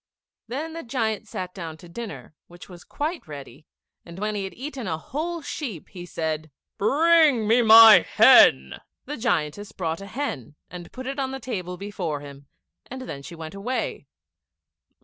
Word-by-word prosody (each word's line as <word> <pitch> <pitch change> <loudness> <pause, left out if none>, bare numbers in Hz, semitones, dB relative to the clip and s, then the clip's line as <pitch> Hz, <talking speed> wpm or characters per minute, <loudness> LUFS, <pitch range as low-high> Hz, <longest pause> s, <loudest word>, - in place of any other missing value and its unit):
Then 305 +6 -5
the 330 - -6
giant 225 -4 -2
sat 180 -3 -6
down 165 -4 -7
to 175 - -14
dinner, 215 -1 -8
which 175 0 -14
was 175 -2 -13
quite 310 - -4
ready, 145 0 -11 0.4
and 170 0 -12
when 210 +2 -2
he 200 -2 -3
had 190 - -8
eaten 265 -3 -6
a 160 - -2
whole 320 - -5
sheep, 235 - -6
he 175 -2 -10
said, 160 -2 -3 0.3
"Bring 295 -1 +4
me 230 +3 +4
my 225 -3 +10
hen." 65 - +5 0.3
The 295 +3 -6
giantess 205 - -1
brought 165 -3 -4
a 195 - -8
hen, 200 - -5 0.2
and 175 0 -9
put 260 0 -8
it 275 +2 -4
on 265 -1 -1
the 265 0 -6
table 180 -9 -5
before 180 -7 -4
him, 140 -1 -12 0.4
and 260 +1 -7
then 145 - -7
she 170 - -10
went 160 0 -8
away. 225 +6 -4
205 Hz, 170 wpm, -24 LUFS, 165-260 Hz, 0.4 s, my